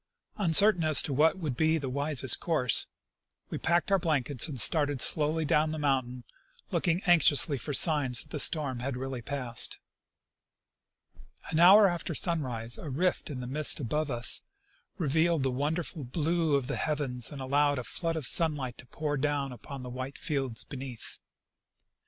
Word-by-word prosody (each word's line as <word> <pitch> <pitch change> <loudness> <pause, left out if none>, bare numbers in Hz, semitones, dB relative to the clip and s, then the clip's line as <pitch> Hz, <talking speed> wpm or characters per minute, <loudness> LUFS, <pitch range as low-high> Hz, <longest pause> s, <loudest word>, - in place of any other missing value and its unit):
Uncer 200 +3 +4
tain 175 - -5
as 155 -2 +5
to 140 - -4
what 155 +6 +2
would 155 -8 -4
be 160 +3 +1
the 140 -4 -5
wisest 140 0 +2
course, 140 -9 +3 0.6
we - - -4
packed 175 +3 0
our 195 - +3
blankets 145 -5 +1
and 140 -5 -7
started 145 0 +3
slowly 155 +4 +3
down 150 +2 +1
the 155 - -5
mountain, 130 -4 -2 0.5
looking 175 +2 -1
anx 175 -4 +4
iously 145 -2 +2
for 150 - -3
signs 145 -5 +3
that - - -24
the 150 - -4
storm 140 -5 +3
had 130 +1 -4
really 130 -1 -6
passed. 125 -3 0 1.7
An 160 - 0
hour 195 +4 +7
after 175 -2 -4
sunrise 125 -10 -1
a 155 - -8
rift 175 +8 -2
in 130 -4 -6
the - - -6
mist 150 +4 0
above 150 +4 -3
us 120 -2 0 0.6
revealed 160 -1 0
the 135 - 0
wonderful 150 +3 -4
blue 160 +3 -1
of 140 -2 -1
the 145 - -4
heavens, 135 -6 -2
and 145 - -9
allowed 145 +2 0
a 125 - -4
flood 165 +6 -3
of 155 -4 -4
sunlight 145 -6 0
to 125 - -10
jjour 145 -1 -4
down 145 -2 -2
upon 130 +2 -10
the 125 - -8
white 130 +2 -7
fields 135 -8 -3
beneath. 130 -4 -9
145 Hz, 170 wpm, -28 LUFS, 130-160 Hz, 1.7 s, hour